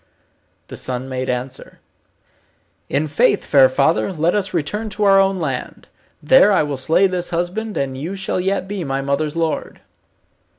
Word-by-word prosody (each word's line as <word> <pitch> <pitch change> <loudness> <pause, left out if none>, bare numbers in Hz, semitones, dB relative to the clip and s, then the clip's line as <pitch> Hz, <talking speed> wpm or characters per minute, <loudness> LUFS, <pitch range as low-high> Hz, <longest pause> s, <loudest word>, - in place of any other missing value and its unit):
The - - -8
son 130 0 -3
made 130 0 -4
answer, 125 +1 -5 1.1
"In 145 +3 0
faith, 145 - +2
fair 135 -3 +5
father, 145 +8 +1
let 165 0 0
us 200 -2 0
return 195 +7 -2
to 210 +1 -3
our 195 -1 +6
own 195 -1 +2
land. 135 -6 -5 0.4
There 210 - +6
I 190 - +3
will 145 -1 -3
slay 160 +8 +3
this 180 -2 -1
husband, 180 +6 -3
and 135 -1 -2
you 160 +9 -5
shall 190 -1 -2
yet 190 +1 -1
be 200 -2 -4
my 135 -2 -2
mother's 145 +2 -1
lord." 165 -2 -3
165 Hz, 165 wpm, -19 LUFS, 135-195 Hz, 1.1 s, our